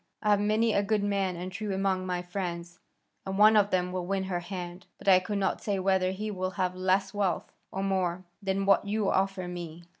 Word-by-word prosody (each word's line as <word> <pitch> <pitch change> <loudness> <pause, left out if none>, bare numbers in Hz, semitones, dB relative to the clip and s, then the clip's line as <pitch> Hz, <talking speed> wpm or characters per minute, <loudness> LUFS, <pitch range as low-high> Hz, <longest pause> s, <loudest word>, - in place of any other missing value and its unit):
I 210 - +3
have 205 - +4
many 215 +2 +2
a 200 - +3
good 205 0 0
man 195 -3 0
and 180 +2 -5
true 205 0 -3
among 190 -1 0
my 180 -1 -2
friends, 175 -1 -5 0.4
and 190 0 -4
one 215 +1 +7
of 205 -1 +5
them 180 -2 0
will 185 -1 -2
win 195 0 0
her 185 -2 -2
hand; 175 0 -7
but - - -14
I 185 -2 +8
could 200 +3 -3
not 195 -1 0
say 205 -2 -1
whether 190 -1 +2
he 210 +3 -3
will 185 -2 -2
have 180 0 0
less 190 +1 +1
wealth, 200 -3 -1 0.2
or 195 - -3
more, 185 -2 0 0.2
than 195 0 -1
what 195 0 +5
you 205 0 0
offer 190 -1 0
me. 175 -1 -7
190 Hz, 220 wpm, -29 LUFS, 180-200 Hz, 0.4 s, I